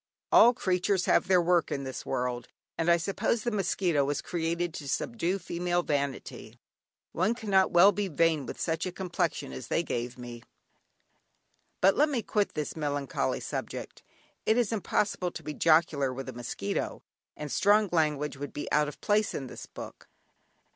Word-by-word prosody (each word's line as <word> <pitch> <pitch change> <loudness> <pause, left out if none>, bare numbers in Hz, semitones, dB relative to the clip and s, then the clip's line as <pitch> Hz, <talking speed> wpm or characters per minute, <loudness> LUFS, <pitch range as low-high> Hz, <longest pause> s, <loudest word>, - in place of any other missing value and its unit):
All 240 +1 +7
creatures 185 -2 +1
have - - +3
their 185 -1 +5
work 175 0 +2
in 140 - -2
this 130 -1 -6
world, 125 -2 -2 0.3
and 165 +1 0
I 170 - +6
suppose 195 +5 -1
the 240 - -1
mosquito 180 -6 +1
was 140 +1 -1
created 170 0 -2
to 140 -3 -6
subdue 195 - -1
female 175 -1 -1
vanity; 140 -4 -3 0.5
one 190 +7 +1
cannot 200 -5 +2
well 175 +4 +7
be 205 -1 -2
vain 160 -4 +1
with - - -7
such 165 +2 -1
a - - -3
complexion 175 - -2
as 65 - -7
they 170 - +1
gave 120 -4 -4
me. 120 -1 -8 1.4
But 195 +1 +5
let 300 +2 +4
me 250 -6 -1
quit 205 -2 0
this 150 -1 -3
melancholy 145 - -2
subject; - - -5 0.4
it 220 - +2
is 235 -4 +1
impossible 200 -3 0
to 160 - -9
be 150 +1 -5
jocular 155 -4 +3
with 135 +1 -6
a 130 - -6
mosquito, 115 -4 -4 0.3
and 150 -2 -6
strong 210 +1 +4
language 150 -4 0
would 145 +1 -6
be 145 - -5
out 150 0 +3
of 150 - -9
place 210 +1 +1
in 135 - -4
this - - -9
book. - - -10
170 Hz, 170 wpm, -29 LUFS, 145-195 Hz, 1.4 s, All